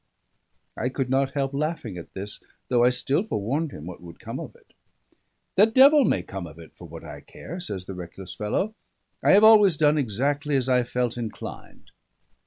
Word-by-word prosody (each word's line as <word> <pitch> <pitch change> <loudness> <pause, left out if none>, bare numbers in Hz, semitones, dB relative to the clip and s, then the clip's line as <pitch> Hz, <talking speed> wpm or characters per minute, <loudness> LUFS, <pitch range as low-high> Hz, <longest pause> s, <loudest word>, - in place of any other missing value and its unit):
I 125 - -2
could 130 -1 -3
not 135 0 +1
help 135 -1 -1
laughing 145 - -3
at 85 - -10
this; 100 +2 -6 0.3
though 120 -1 +3
I 125 - +6
still 125 +5 +1
forewarned 145 - -2
him 75 - -9
what 90 0 -9
would 85 -1 -12
come - - -6
of - - -8
it. - - -25 0.8
"The 205 +3 +7
devil 270 +4 +6
may 90 - +1
come 95 -1 -7
of 80 0 -13
it 80 -2 -13
for - - -12
what - - -10
I - - -9
care," 175 +4 -9
says 100 - -5
the 95 - -7
reckless 90 +1 -8
fellow. 105 - -2 0.5
"I - - +4
have 205 +2 +6
always 210 -6 +7
done 150 0 +3
exactly 140 +5 -1
as 130 -2 +1
I 125 -1 +3
felt 125 -1 -2
inclined." 115 -2 -8
130 Hz, 195 wpm, -25 LUFS, 100-155 Hz, 0.8 s, The